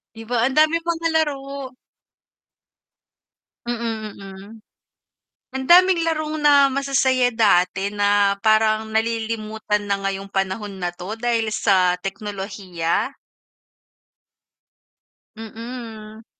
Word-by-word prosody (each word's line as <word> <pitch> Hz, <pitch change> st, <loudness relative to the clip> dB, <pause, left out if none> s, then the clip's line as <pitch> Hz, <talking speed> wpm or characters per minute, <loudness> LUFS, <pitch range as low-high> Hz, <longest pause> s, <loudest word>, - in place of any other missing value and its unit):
'Di 225 Hz, -, -9 dB
ba, 235 Hz, +1 st, +1 dB
ang 265 Hz, -, -4 dB
daming 315 Hz, +2 st, +4 dB
mga 335 Hz, 0 st, -2 dB
laro. 275 Hz, -4 st, -2 dB, 1.9 s
Mm, 230 Hz, -2 st, -4 dB
mm. 195 Hz, -1 st, -10 dB, 1.1 s
Ang 265 Hz, 0 st, -3 dB
daming 360 Hz, +1 st, +6 dB
larong 310 Hz, -1 st, -2 dB
na 285 Hz, -1 st, +6 dB
masasaya 265 Hz, -2 st, +2 dB
dati 195 Hz, -3 st, +2 dB
na 205 Hz, -1 st, +2 dB
parang 220 Hz, 0 st, +3 dB
nalilimutan 220 Hz, -1 st, -1 dB
na 200 Hz, 0 st, 0 dB
ngayong 195 Hz, 0 st, -3 dB
panahon 195 Hz, +1 st, -2 dB
na 175 Hz, -1 st, -2 dB
'to 180 Hz, +4 st, -6 dB
dahil 230 Hz, -1 st, 0 dB
sa 185 Hz, -3 st, +3 dB
teknolohiya. 195 Hz, -4 st, -3 dB, 2.3 s
Mm. 225 Hz, -1 st, -9 dB
220 Hz, 95 wpm, -21 LUFS, 200-265 Hz, 2.3 s, daming